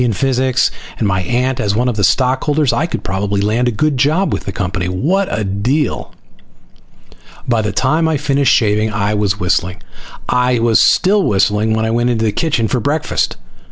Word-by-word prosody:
in 120 Hz, -, +1 dB
physics, 130 Hz, +2 st, +1 dB, 0.3 s
and 110 Hz, -, 0 dB
my 95 Hz, -1 st, 0 dB
aunt 125 Hz, +7 st, -1 dB
as 100 Hz, -3 st, 0 dB
one 120 Hz, +3 st, +1 dB
of 125 Hz, -, -1 dB
the 105 Hz, -, -1 dB
stockholders, 135 Hz, -, +1 dB
I 165 Hz, -, 0 dB
could -, -, -5 dB
probably 100 Hz, +1 st, -2 dB
land 110 Hz, +5 st, 0 dB
a -, -, +1 dB
good 145 Hz, +5 st, 0 dB
job 155 Hz, +9 st, +1 dB
with -, -, -4 dB
the 95 Hz, -, -3 dB
company. 95 Hz, -1 st, -3 dB
What 165 Hz, -, 0 dB
a 110 Hz, -, -2 dB
deal! 115 Hz, +9 st, -1 dB, 1.4 s
By 115 Hz, -2 st, +1 dB
the 105 Hz, 0 st, -2 dB
time 155 Hz, +10 st, +1 dB
I 160 Hz, -2 st, +1 dB
finished 140 Hz, -1 st, +1 dB
shaving 105 Hz, 0 st, +2 dB
I 105 Hz, 0 st, -1 dB
was 105 Hz, -1 st, -1 dB
whistling. 90 Hz, 0 st, -1 dB, 0.4 s
I 125 Hz, 0 st, +1 dB
was 115 Hz, -1 st, +3 dB
still 205 Hz, +2 st, +3 dB
whistling 105 Hz, -, +1 dB
when 110 Hz, 0 st, 0 dB
I 110 Hz, -, -1 dB
went 120 Hz, +1 st, +1 dB
into 115 Hz, -2 st, 0 dB
the 110 Hz, -, +1 dB
kitchen 120 Hz, -4 st, 0 dB
for 125 Hz, -, -1 dB
breakfast. 145 Hz, +6 st, -1 dB
115 Hz, 190 wpm, -16 LUFS, 105-135 Hz, 1.4 s, was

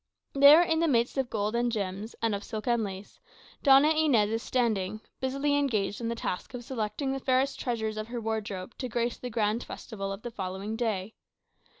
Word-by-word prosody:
There, 285 Hz, +4 st, +8 dB
in 325 Hz, -2 st, +1 dB
the 335 Hz, -, +3 dB
midst 240 Hz, -1 st, +1 dB
of 260 Hz, -2 st, -1 dB
gold 210 Hz, +1 st, -1 dB
and 240 Hz, 0 st, +1 dB
gems, 200 Hz, 0 st, -4 dB
and 225 Hz, -2 st, +2 dB
of 200 Hz, +1 st, -3 dB
silk 215 Hz, -2 st, -6 dB
and 235 Hz, -2 st, +2 dB
lace, 195 Hz, 0 st, -7 dB, 0.4 s
Doña 280 Hz, +3 st, +6 dB
Inez 250 Hz, -10 st, +3 dB
is 225 Hz, 0 st, -1 dB
standing, 215 Hz, -6 st, 0 dB, 0.2 s
busily 275 Hz, +2 st, 0 dB
engaged 220 Hz, -8 st, 0 dB
in 230 Hz, -, -2 dB
the 235 Hz, -, -2 dB
task 230 Hz, +1 st, -4 dB
of 245 Hz, -, -6 dB
selecting 235 Hz, +2 st, -3 dB
the 270 Hz, -, -2 dB
fairest 265 Hz, +1 st, +1 dB
treasures 220 Hz, -3 st, -2 dB
of 215 Hz, 0 st, -4 dB
her 240 Hz, 0 st, -4 dB
wardrobe 215 Hz, -3 st, -4 dB
to 255 Hz, -, -3 dB
grace 235 Hz, +1 st, -1 dB
the 250 Hz, -, -5 dB
grand 220 Hz, 0 st, 0 dB
festival 195 Hz, -4 st, -6 dB
of 195 Hz, +2 st, -7 dB
the 240 Hz, -, -5 dB
following 195 Hz, +1 st, -4 dB
day. 220 Hz, -3 st, -2 dB
230 Hz, 200 wpm, -29 LUFS, 210-260 Hz, 0.4 s, There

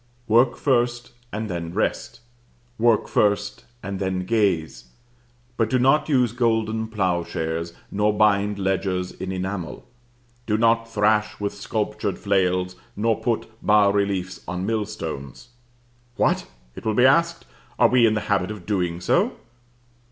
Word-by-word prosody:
Work 120 Hz, +2 st, +4 dB
first, 120 Hz, -3 st, 0 dB, 0.2 s
and 110 Hz, +1 st, -3 dB
then 85 Hz, -2 st, -5 dB
rest. 110 Hz, +2 st, -2 dB, 0.6 s
Work 115 Hz, -1 st, +3 dB
first 105 Hz, 0 st, 0 dB, 0.2 s
and 100 Hz, -1 st, -4 dB
then 95 Hz, -1 st, -2 dB
gaze, 95 Hz, -7 st, 0 dB, 0.7 s
but 115 Hz, -2 st, +1 dB
do 130 Hz, -, +2 dB
not 135 Hz, +5 st, +3 dB
use 125 Hz, -5 st, +3 dB
golden 110 Hz, -2 st, 0 dB
ploughshares, 85 Hz, -5 st, -2 dB, 0.2 s
nor 105 Hz, +1 st, +2 dB
bind 105 Hz, -1 st, +2 dB
ledgers 95 Hz, -1 st, -1 dB
in 95 Hz, -, -6 dB
enamel. 95 Hz, -2 st, -5 dB, 0.6 s
Do 105 Hz, -1 st, +1 dB
not 115 Hz, 0 st, +2 dB
thrash 105 Hz, 0 st, +1 dB
with 100 Hz, -1 st, -2 dB
sculptured -, -, -3 dB
flails: 90 Hz, -2 st, 0 dB, 0.2 s
nor 110 Hz, +2 st, +1 dB
put 120 Hz, -3 st, 0 dB, 0.2 s
bas 105 Hz, -1 st, +4 dB
reliefs 95 Hz, -3 st, -1 dB
on 90 Hz, +1 st, -3 dB
millstones. 105 Hz, -, -4 dB, 0.7 s
What! -, -, +1 dB, 0.3 s
it -, -, -9 dB
will 110 Hz, -1 st, 0 dB
be 125 Hz, -, +5 dB
asked, 170 Hz, +5 st, +3 dB, 0.3 s
are 120 Hz, -, +5 dB
we 120 Hz, -1 st, +5 dB
in 110 Hz, -, +1 dB
the 105 Hz, -, -1 dB
habit 100 Hz, -3 st, 0 dB
of 105 Hz, -5 st, -8 dB
doing 90 Hz, -4 st, -1 dB
so? -, -, +1 dB
105 Hz, 135 wpm, -23 LUFS, 95-115 Hz, 0.7 s, be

